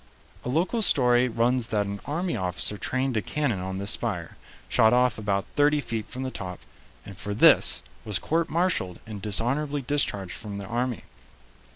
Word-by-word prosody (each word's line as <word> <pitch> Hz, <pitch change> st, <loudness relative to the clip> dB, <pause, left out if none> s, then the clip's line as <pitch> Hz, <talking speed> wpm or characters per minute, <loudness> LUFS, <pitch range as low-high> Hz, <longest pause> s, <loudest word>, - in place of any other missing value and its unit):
A -, -, -4 dB
local 175 Hz, -, +1 dB
story 125 Hz, -, +4 dB
runs 120 Hz, +1 st, +1 dB
that 105 Hz, -3 st, 0 dB
an 100 Hz, 0 st, -5 dB
army 170 Hz, +5 st, -1 dB
officer 90 Hz, +2 st, -1 dB
trained 130 Hz, +4 st, -1 dB
a -, -, +1 dB
cannon 135 Hz, -5 st, -1 dB
on 95 Hz, +1 st, -4 dB
this 100 Hz, +1 st, 0 dB
spire, 95 Hz, -8 st, -2 dB, 0.3 s
shot 110 Hz, +1 st, +4 dB
off 125 Hz, -2 st, +3 dB
about 100 Hz, -2 st, -1 dB
thirty 145 Hz, 0 st, +4 dB
feet 115 Hz, -6 st, -4 dB
from 130 Hz, +1 st, -6 dB
the 130 Hz, -, -3 dB
top, 90 Hz, -5 st, -6 dB, 0.5 s
and 100 Hz, -, -9 dB
for 100 Hz, +2 st, -4 dB
this -, -, +5 dB, 0.2 s
was 105 Hz, -3 st, -2 dB
court 165 Hz, +1 st, 0 dB
martialed 165 Hz, -, 0 dB
and 105 Hz, -3 st, -7 dB
dishonorably 135 Hz, +8 st, 0 dB
discharged 120 Hz, -9 st, 0 dB
from 105 Hz, -2 st, -7 dB
the 100 Hz, -, -6 dB
army. 120 Hz, +3 st, -2 dB
115 Hz, 175 wpm, -26 LUFS, 100-140 Hz, 0.5 s, this